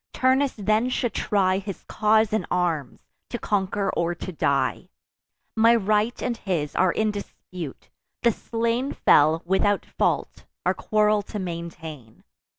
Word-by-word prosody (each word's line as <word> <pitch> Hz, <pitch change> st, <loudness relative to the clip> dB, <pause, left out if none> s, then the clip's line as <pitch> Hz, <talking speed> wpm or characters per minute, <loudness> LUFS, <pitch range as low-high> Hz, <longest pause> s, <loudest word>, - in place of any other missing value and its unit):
Turnus 260 Hz, +1 st, +2 dB
then 215 Hz, +3 st, +1 dB
should 245 Hz, -2 st, -1 dB
try 190 Hz, -2 st, +1 dB
His 200 Hz, -1 st, -7 dB
cause 215 Hz, 0 st, +2 dB
in 220 Hz, -, 0 dB
arms, 165 Hz, -7 st, -1 dB, 0.3 s
to 240 Hz, -, -3 dB
conquer 200 Hz, -2 st, -1 dB
or 170 Hz, +1 st, 0 dB
to 185 Hz, -, -6 dB
die. 140 Hz, -4 st, 0 dB, 0.7 s
My 230 Hz, +1 st, +5 dB
right 215 Hz, +2 st, +1 dB
and 240 Hz, -, -1 dB
his 170 Hz, -9 st, -2 dB
are 185 Hz, -1 st, +3 dB
in 220 Hz, +3 st, 0 dB
dispute: 180 Hz, -6 st, -8 dB, 0.4 s
the 235 Hz, -, +5 dB
slain 235 Hz, +4 st, -2 dB
Fell 155 Hz, +3 st, +4 dB
without 190 Hz, +3 st, +1 dB
fault, -, -, -1 dB, 0.2 s
our -, -, +3 dB
quarrel 215 Hz, -1 st, +2 dB
to 210 Hz, +1 st, -7 dB
maintain. 165 Hz, -, -7 dB
205 Hz, 140 wpm, -24 LUFS, 175-220 Hz, 0.7 s, My